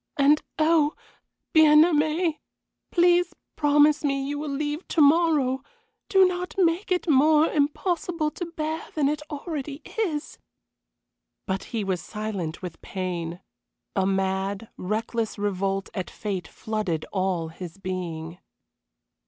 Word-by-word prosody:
"And 290 +2 +5 0.2
oh! 310 -1 +3 0.6
Bien 310 -1 +8
aimé, 315 0 +1 0.5
please 350 0 +3 0.2
promise 295 0 +4
me 275 -1 0
you 290 0 -3
will 300 0 -4
leave 295 +4 -3
to 335 - -1
morrow. 290 -4 +4 0.5
Do 385 -1 +6
not 360 0 -2
make 360 +1 +2
it 360 0 +1
more 305 +2 +5
impossible 310 +2 0
to 350 - -5
bear 320 -1 -3
than 295 -3 +2
it 300 +1 -1
already 295 -2 -5 0.2
is." 315 -9 -2 1.1
But 190 -1 -2
he 225 -3 -3
was 190 -3 -1
silent 200 -6 -5
with 170 -3 -7
pain. 180 -2 -4 0.5
A 190 -1 +2
mad, 195 +2 -1
reckless 220 +3 -2
revolt 195 -1 -1
at 185 - -4
fate 195 -4 -4
flooded 210 -8 -3
all 185 -4 0
his 175 +2 -9
being. 175 -3 -5
280 Hz, 125 wpm, -25 LUFS, 195-315 Hz, 1.1 s, Bien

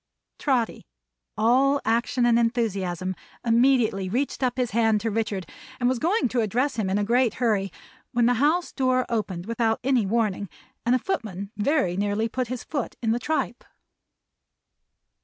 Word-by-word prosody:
Trotty, 250 -6 0 0.5
all 265 +5 +3
action 235 +2 +1
and 235 -1 +4
enthusiasm, 195 -6 -1 0.3
immediately 230 -5 +3
reached 265 +8 -1
up 255 -1 0
his 250 -2 0
hand 225 -1 +3
to 225 +1 -1
Richard, 205 -4 -2 0.3
and 245 - +2
was 255 -1 +1
going 360 - +2
to 245 0 +1
address 245 +7 0
him 205 -4 0
in 195 - +1
a 205 - +1
great 240 +1 +2
hurry, 210 -5 0 0.4
when 240 -2 +2
the 245 - +4
house 335 +5 +2
door 255 -2 +1
opened 190 -6 -2
without 225 0 0
any 250 -6 +2
warning, 205 -3 0 0.4
and 245 - +5
a - - +4
footman 210 - -4
very 210 - +1
nearly 205 +3 0
put 250 +2 -2
his 250 0 -5
foot 285 -6 -4
in 225 - +2
the 235 - +1
tripe. 315 +4 -2
230 Hz, 160 wpm, -25 LUFS, 210-255 Hz, 0.5 s, and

